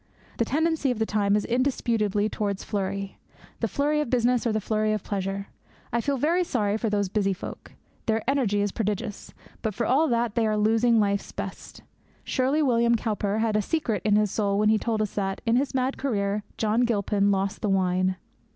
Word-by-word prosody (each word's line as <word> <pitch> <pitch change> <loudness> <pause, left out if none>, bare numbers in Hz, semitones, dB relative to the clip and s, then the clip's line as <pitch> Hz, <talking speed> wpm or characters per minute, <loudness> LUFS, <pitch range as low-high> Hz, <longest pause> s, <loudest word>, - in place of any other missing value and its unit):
The 230 - +3
tendency 315 +2 +1
of 250 - 0
the 220 - +1
time 205 -1 +1
is 210 - 0
indisputably 230 -5 +1
towards 205 -2 -3
flurry 195 -1 -3 0.4
the - - 0
flurry 300 +1 +1
of 295 - -3
business 245 0 +2
or - - +1
the 215 - 0
flurry 215 +1 0
of 215 - -2
pleasure. 195 0 -3 0.4
I 235 - +2
feel 280 +2 0
very 335 +7 +2
sorry 210 -11 0
for 220 0 -1
these 205 -1 +1
busy 195 0 0
folk. 185 - -9 0.3
Their 225 0 0
energy 245 -7 +2
is 205 -1 0
prodigious. 210 -1 -3 0.3
But, 215 -4 -2
for 235 - -1
all 285 +7 +3
that, 235 -4 0
they 225 -1 +1
are 215 0 +1
losing 225 +2 +3
life's 200 -1 0
best. 200 -1 -7 0.4
Surely 275 +4 +1
William 235 -3 +3
Cowper 210 -2 -1
had 220 -1 +1
a 215 - +3
secret 225 - -1
in 210 -1 +3
his 210 -2 +2
soul 200 -2 0
when 210 +1 +3
he 215 0 +4
told 220 -1 0
us 210 - -4
that, 195 -1 -2
in 230 0 +3
his 265 +2 0
mad 260 +1 0
career, 205 -6 -1
John 220 +2 +1
Gilpin 205 -3 +1
lost 195 +1 0
the 210 - 0
wine! 185 -1 +1
215 Hz, 200 wpm, -26 LUFS, 200-240 Hz, 0.4 s, he